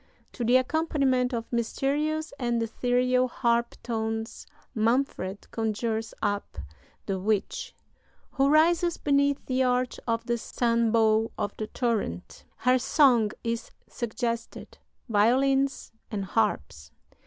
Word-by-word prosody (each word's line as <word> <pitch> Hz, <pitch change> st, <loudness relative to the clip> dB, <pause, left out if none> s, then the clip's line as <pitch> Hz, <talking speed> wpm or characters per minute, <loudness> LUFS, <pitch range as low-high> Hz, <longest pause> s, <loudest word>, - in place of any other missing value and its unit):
To 240 Hz, -, -5 dB
the 245 Hz, +2 st, +5 dB
accompaniment 265 Hz, -3 st, +1 dB
of 235 Hz, -1 st, -4 dB
mysterious 295 Hz, +6 st, -1 dB
and 240 Hz, -2 st, 0 dB
ethereal 250 Hz, +2 st, +1 dB
harp 235 Hz, -1 st, 0 dB
tones 225 Hz, -1 st, -3 dB, 0.3 s
Manfred 225 Hz, -4 st, 0 dB
conjures 225 Hz, 0 st, -2 dB
up 205 Hz, -, -2 dB, 0.5 s
the 195 Hz, -1 st, -2 dB
witch, 205 Hz, +1 st, -2 dB, 0.6 s
"who 275 Hz, 0 st, +2 dB
rises 335 Hz, +3 st, +3 dB
beneath 280 Hz, 0 st, +1 dB
the 255 Hz, 0 st, 0 dB
arch 250 Hz, 0 st, +1 dB
of 230 Hz, 0 st, -1 dB
the 235 Hz, 0 st, -1 dB
sunbow 225 Hz, -2 st, +2 dB
of 205 Hz, -, -3 dB
the 215 Hz, -, -4 dB
torrent." 215 Hz, -, -3 dB
Her 255 Hz, 0 st, +2 dB
song 250 Hz, -4 st, +4 dB
is 230 Hz, 0 st, -3 dB, 0.2 s
suggested 230 Hz, 0 st, -4 dB, 0.3 s
(violins 270 Hz, +5 st, +2 dB, 0.2 s
and 200 Hz, -3 st, -3 dB
harps). 80 Hz, -, -1 dB
235 Hz, 110 wpm, -27 LUFS, 220-265 Hz, 0.6 s, the